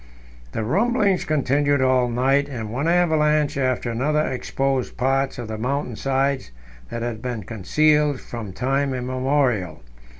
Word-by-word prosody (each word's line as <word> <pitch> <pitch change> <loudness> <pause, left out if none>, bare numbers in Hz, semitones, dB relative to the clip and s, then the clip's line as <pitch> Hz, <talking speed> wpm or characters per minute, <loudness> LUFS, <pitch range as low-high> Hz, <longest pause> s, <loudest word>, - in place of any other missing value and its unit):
The 110 - -2
rumblings 200 - +1
continued 145 -1 +1
all 130 -1 +3
night, 135 +4 +2
and 115 -5 -5
one 140 +6 -1
avalanche 155 -4 +2
after 130 -3 0
another 150 +6 +1
exposed 130 +1 -2
parts 135 +1 0
of 120 -2 -5
the 110 0 -5
mountain 125 0 -2
sides 135 - 0 0.4
that 115 - -4
had 115 -2 -4
been 120 -4 -4
concealed 150 +6 +2
from 115 -5 -7
time 135 +5 0
immemorial. 125 - 0
135 Hz, 135 wpm, -22 LUFS, 120-145 Hz, 0.4 s, all